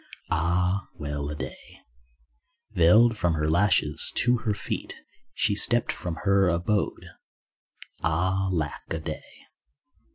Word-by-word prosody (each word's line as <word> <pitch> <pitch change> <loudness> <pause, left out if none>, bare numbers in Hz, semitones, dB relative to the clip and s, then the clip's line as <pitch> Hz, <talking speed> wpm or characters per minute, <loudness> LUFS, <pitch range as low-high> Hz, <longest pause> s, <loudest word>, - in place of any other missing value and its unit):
(Ah, 90 +4 +1
well 75 -2 -4
a 75 - -4
day) 65 -2 -8 0.9
Veiled 110 +8 +5
from 90 -5 0
her 75 0 -1
lashes 80 -3 +2
to 125 0 +3
her 110 -2 -1
feet - - -4 0.4
She - - +2
stepped 120 +3 +3
from 85 -2 -5
her 100 -2 +3
abode, 90 +5 -1 1.0
(Ah, 95 +4 0
lack 80 -4 -2
a 80 - -2
day). 80 - -8
90 Hz, 120 wpm, -26 LUFS, 80-100 Hz, 1.0 s, Veiled